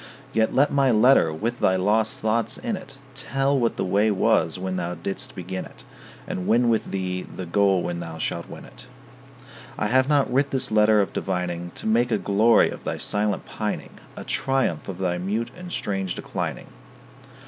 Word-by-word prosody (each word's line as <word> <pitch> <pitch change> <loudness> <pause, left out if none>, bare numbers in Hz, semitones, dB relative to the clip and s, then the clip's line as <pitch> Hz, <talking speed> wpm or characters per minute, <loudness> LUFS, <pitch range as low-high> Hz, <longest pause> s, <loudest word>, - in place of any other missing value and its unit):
Yet 110 0 +2
let 140 +2 +3
my 140 -2 +3
letter 115 -6 +5
with 115 +10 -3
thy 95 - +3
lost 105 +4 +1
thoughts 115 +2 0
in 235 -4 -2
it 180 -8 -10 0.2
Tell 135 +1 0
what 115 -2 0
the - - -1
way 100 +4 +2
was 95 -4 +2
when 95 0 -3
thou 90 0 -3
didst 85 +4 -5
begin 95 0 -5
it, - - -12 0.4
And 90 - -4
win 120 +1 +4
with 110 -1 +1
thee 95 -1 -2
the 95 - -8
goal 95 +1 +2
when 85 -1 -3
thou 85 -1 -6
shalt - - -3
win - - -9
it. 125 +1 -13 0.9
I - - -1
have 130 +5 +3
not 140 -4 +2
writ 140 +2 +2
this 130 -4 -1
letter 105 0 +5
of 100 - -2
divining 90 -2 -2
To - - -6
make 115 +3 +2
a - - +2
glory 110 +4 +4
of - - -9
thy - - -3
silent 105 -2 -1
pining, - - -5 0.2
A - - -6
triumph 135 - -1
of 95 - -5
thy 90 -2 -1
mute 110 +6 -2
and 180 0 -9
strange 95 - -2
declining. - - -4
105 Hz, 190 wpm, -24 LUFS, 95-120 Hz, 0.9 s, letter